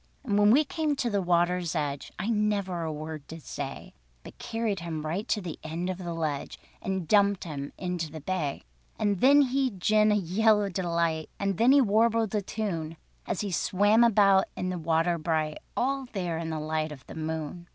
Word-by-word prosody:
And 215 -7 -1
when 205 0 +6
we 275 +8 +6
came 305 0 -1
to 245 -4 -1
the 200 -1 +1
water's 175 -1 +1
edge, 145 -3 -3
I 195 - -3
never 205 -5 0
a 160 -1 -2
word 155 -1 -7
did 160 -1 -9
say, 140 -1 -6 0.3
But - - -13
carried 225 -4 -2
him 160 -2 -5
right 175 +7 -3
to 210 - 0
the 175 -4 -6
end 170 +4 -3
of 185 - -6
the 170 -2 -4
Ledge, 155 -4 -3 0.2
And 190 -3 -3
dumped 200 -1 +3
him 145 -4 -5
into 180 -3 -3
the 160 - -7
Bay. 155 -3 -3 0.3
And 205 -3 0
then 285 +2 +7
he 265 0 +1
gin 215 +1 +2
a - - +3
yell 210 +3 +3
of 195 - -5
delight, 170 -3 -1
And 195 -2 -1
then 235 +3 +6
he 280 0 +7
warbled 225 -1 +2
a 210 - +1
tune, 170 -6 -4 0.3
As - - -1
he 205 -2 -3
swam 205 +7 +3
about 195 -4 +5
in 185 - -2
the 180 -1 -3
water 165 +1 +1
bright, 155 -1 -1 0.2
All 270 +1 0
there 175 -5 -2
in 165 -1 -4
the 160 -1 -3
light 155 0 -2
of 135 -3 -11
the - - -10
moon. 160 +2 -5
180 Hz, 205 wpm, -28 LUFS, 160-210 Hz, 0.3 s, then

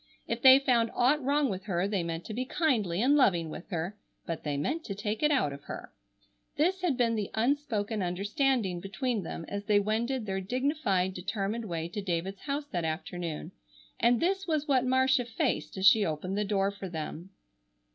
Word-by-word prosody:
If 230 0 -2
they 260 0 +10
found 245 -4 +2
aught 270 +4 +3
wrong 285 +2 +2
with 190 -3 -4
her 185 -2 0
they 200 -3 0
meant 165 0 -4
to 220 - -6
be 250 +4 -1
kindly 230 - 0
and 280 +3 +5
loving 175 - +3
with 170 - -9
her, 175 +2 -3 0.3
but 165 -2 -4
they 145 -2 -2
meant 310 - -1
to 200 - -4
take 210 +1 -3
it 300 - +4
out 260 - +2
of 140 0 -11
her. - - -8 0.6
This 360 +5 +2
had 330 -8 +1
been 235 -2 +2
the 210 -3 -2
unspoken 225 -4 0
understanding 200 +2 0
between 215 +5 -2
them 165 -1 -6
as 200 0 -5
they 205 0 +4
wended 225 +4 -1
their 190 -1 -2
dignified, 220 - 0
determined 200 +4 -3
way 165 -4 -3
to 205 +4 -4
David's 190 +1 -3
house 285 0 -3
that 175 -2 -1
afternoon, 165 0 -4 0.5
and 235 0 +4
this 385 +2 0
was 310 -2 0
what 260 -3 +3
Marcia 260 +1 +3
faced 230 -3 -2
as 190 - 0
she 215 +1 +7
opened 180 +2 -2
the 210 - +1
door 195 -1 +1
for 200 -2 -7
them. 165 +2 -6
210 Hz, 195 wpm, -29 LUFS, 185-260 Hz, 0.6 s, they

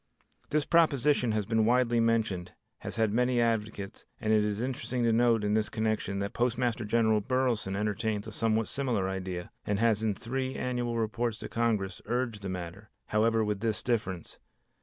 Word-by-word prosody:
This 150 -1 +1
proposition 145 -6 +3
has 105 -2 0
been 110 +1 +2
widely 120 0 +3
mentioned, 110 -6 0 0.3
has - - -6
had 110 -2 +1
many 125 +1 +2
advocates, 110 -4 -2
and 110 -1 +1
it 105 -1 +4
is 105 0 -1
interesting 125 0 -2
to 115 -1 +3
note 115 -1 +3
in 105 0 +1
this 110 -1 +1
connection 110 -3 -1
that 100 0 -3
Postmaster 120 -1 0
General 110 -1 +3
Burleson 125 -5 0
entertains 105 0 -1
a 110 - -7
somewhat 110 +1 +1
similar 120 -9 -1
idea, 95 -2 -4
and 105 -1 -1
has 110 -1 +2
in 110 -2 0
three 130 +5 -3
annual 120 -2 -2
reports 115 0 -1
to - - -7
Congress 110 -6 -1
urged 120 -4 -1
the 100 - -4
matter, 95 +3 -6 0.2
however, 110 +1 +3
with 105 -1 -1
this 110 0 -1
difference. 100 -8 -2
110 Hz, 175 wpm, -29 LUFS, 105-120 Hz, 0.3 s, it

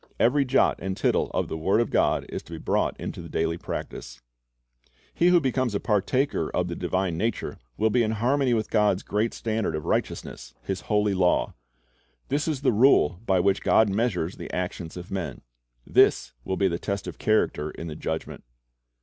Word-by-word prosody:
Every 140 +4 +3
jot 130 +1 +2
and 95 0 -3
tittle - - +1
of - - -1
the - - -4
word 95 +7 +2
of 120 - 0
God - - +2
is - - -5
to - - -12
be - - -5
brought - - -1
into - - -5
the - - -10
daily 80 +1 -1
practise. - - -6 0.9
He 175 - +3
who 180 -1 +6
becomes 130 -5 0
a - - +1
partaker 125 +7 0
of 90 - -1
the 85 - -4
divine 90 -1 -1
nature 115 +1 -2 0.2
will 110 0 +2
be 125 - +3
in 110 -1 +1
harmony 125 +3 +2
with 110 -1 -2
God's 105 -3 +2
great 105 +3 0
standard 110 -6 -2
of 75 - -5
righteousness, - - -3
His 95 0 -3
holy 105 -1 +1
law. 90 -2 +2 0.8
This 145 +3 0
is 150 -4 -1
the 135 - +3
rule 105 - +4
by 95 -2 +3
which 100 +1 +2
God 110 -2 +4
measures 95 -5 -1
the - - -7
actions 90 -1 -4
of 90 0 -9
men. 95 -3 -4 0.4
This - - +3
will 95 +6 -2
be 100 - +3
the 85 -1 -2
test 100 -1 -3
of 90 - -7
character 110 -8 +1
in 80 - -8
the 80 -2 -6
Judgment. 80 +1 -5
100 Hz, 190 wpm, -26 LUFS, 90-120 Hz, 0.9 s, who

